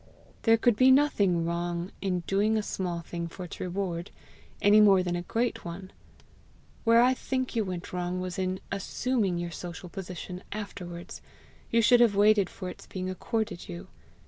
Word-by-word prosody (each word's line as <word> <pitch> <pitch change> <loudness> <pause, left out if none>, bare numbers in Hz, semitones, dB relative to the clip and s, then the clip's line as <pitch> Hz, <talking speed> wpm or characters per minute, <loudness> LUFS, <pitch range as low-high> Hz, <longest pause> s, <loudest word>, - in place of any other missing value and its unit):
"There 225 -1 +5
could 240 0 +3
be 255 +4 +5
nothing 205 - +4
wrong 170 +1 -2
in 185 -2 0
doing 205 +5 +1
a 215 - 0
small 175 -4 -3
thing 170 0 -5
for 180 +2 -8
its 175 - -8
reward 180 -1 -3 0.5
any 210 +1 +6
more 195 -3 +6
than 175 -1 -1
a 175 - -2
great 230 +7 -1
one; 185 +3 -7 0.9
where 230 0 +6
I 255 +1 +5
think 260 -1 -3
you 225 - +2
went 180 -3 -6
wrong 180 0 -2
was 185 0 -4
in 185 0 -1
ASSUMING 200 0 -1
your 175 0 -3
social 175 +1 -7
position 180 0 -7
afterwards: 180 -4 -7 0.5
you 230 0 +3
should 245 +2 +6
have 235 -4 +5
waited 205 -1 +4
for 185 - -7
its - - -9
being 185 0 -4
accorded 220 0 -3
you. 85 0 -8
185 Hz, 170 wpm, -28 LUFS, 175-215 Hz, 0.9 s, any